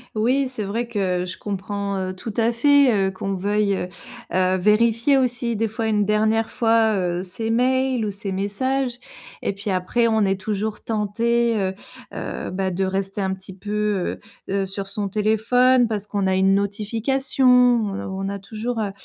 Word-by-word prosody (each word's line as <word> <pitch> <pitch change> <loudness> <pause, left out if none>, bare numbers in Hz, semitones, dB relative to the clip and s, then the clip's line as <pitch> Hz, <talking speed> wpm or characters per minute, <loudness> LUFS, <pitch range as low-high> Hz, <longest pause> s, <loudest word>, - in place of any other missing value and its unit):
Oui, 255 +5 +2
c'est 250 -4 -5
vrai 230 +4 -2
que 185 -5 -1
je 180 - -7
comprends, 200 0 -3
heu, 185 0 -3
tout 220 +3 -7
à 230 +1 +3
fait, 280 +2 +5 0.2
heu, 190 - -1
qu'on 195 +1 -4
veuille, 205 +1 +1
heu 180 - -3 0.5
heu, 185 0 +2
vérifier 230 +7 +3
aussi 245 -2 0
des 225 +1 0
fois 225 +1 -3
une 210 -2 +2
dernière 220 +1 +2
fois, 225 -2 +3
heu, 180 -1 -1
ses 220 +5 -4
mails 255 0 +1
ou 205 - -2
ses 200 0 -6
messages 245 +6 -1 0.4
et - - -1
puis 205 +2 -6
après 190 +6 +1
on 220 -1 +2
est 195 -1 +1
toujours 210 +2 -3
tenté, 230 +2 +1
heu 190 -2 0 0.4
heu, - - -5
bah 190 0 -1
de 185 +2 -1
rester 195 +1 -2
un 190 0 0
petit 190 0 -10
peu, 210 -1 -2 0.3
heu - - -2
heu, 195 -1 +1
sur 195 +1 -6
son 200 +1 -3
téléphone 225 +4 +3
parce 210 -2 -3
qu'on 200 -2 -1
a 190 - +2
une 195 +1 +4
notification. 225 +7 -1
On 240 -5 +4 0.3
on - - -2
a 200 - -4
toujours, 225 +4 -4
heu 205 -2 -1
210 Hz, 185 wpm, -22 LUFS, 195-235 Hz, 0.5 s, fait